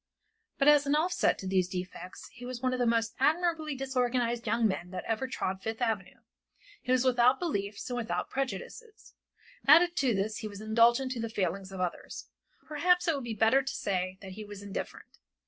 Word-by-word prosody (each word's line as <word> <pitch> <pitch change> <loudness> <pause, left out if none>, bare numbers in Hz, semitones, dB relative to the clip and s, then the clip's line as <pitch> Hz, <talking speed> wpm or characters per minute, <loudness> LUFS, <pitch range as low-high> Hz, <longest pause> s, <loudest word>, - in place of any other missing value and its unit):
But 275 - +2
as 295 -1 +6
an 285 - +3
offset 340 +4 +2
to 190 - -6
these 185 -1 +1
defects 180 0 -7
he 245 - -12
was 250 0 -5
one 255 0 0
of 255 - -2
the 245 - +2
most 230 -1 +1
admirably 315 0 +1
disorganized 250 -3 -1
young 225 +1 +3
men 180 -3 -3
that 180 0 -5
ever 225 +4 -1
trod 190 -6 -3
Fifth 225 +1 -4
avenue. 220 -6 -2 0.6
He 250 - -3
was 255 0 +3
without 250 +1 +4
beliefs 205 - -3
and 245 - -3
without 235 -1 -2
prejudices; 415 - -5 0.5
added 340 +4 +7
to 255 -5 +2
this 210 +3 -1
he 220 - -5
was 200 -1 -9
indulgent 235 +4 +3
to 250 - -3
the 230 0 -3
failings 195 -2 -2
of 190 - -7
others, 180 -1 -4 0.4
or - - -30
perhaps 355 +4 +2
it 330 - +3
would 275 -3 -4
be 230 -2 -4
better 225 +6 +4
to 270 +1 -5
say 185 -2 -2
that 190 - -8
he 215 +3 -8
was 205 -1 -10
indifferent. 200 -1 -7
235 Hz, 200 wpm, -30 LUFS, 200-270 Hz, 0.6 s, added